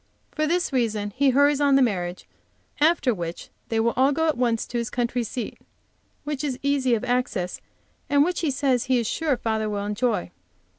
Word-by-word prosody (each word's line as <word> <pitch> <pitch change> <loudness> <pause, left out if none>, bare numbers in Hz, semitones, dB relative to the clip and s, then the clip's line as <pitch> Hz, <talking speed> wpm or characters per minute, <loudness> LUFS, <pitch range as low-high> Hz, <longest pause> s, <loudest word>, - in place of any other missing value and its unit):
For 310 0 -1
this 350 -1 0
reason 215 -5 0
he 280 +1 +3
hurries 285 +2 +3
on 280 -1 +4
the 275 - +5
marriage, 180 -6 -2 0.5
after 300 -4 +3
which 170 -3 -6 0.2
they 225 - 0
will 230 +1 +2
all 265 +3 +4
go 320 +3 +1
at 310 - +2
once 235 -2 0
to 240 - -3
his 235 - -3
country 245 0 -1
seat, 235 +1 -5 0.6
which 295 -1 -4
is 270 -4 -2
easy 275 -3 +2
of 220 - -4
access, 245 -8 -1 0.5
and 285 0 +5
which 355 +2 -1
he 325 - 0
says 265 -3 +1
he 260 -1 +2
is 235 - 0
sure 295 +3 0
father 220 -2 -1
will 205 -1 -3
enjoy. 210 - -1
250 Hz, 195 wpm, -24 LUFS, 225-285 Hz, 0.6 s, the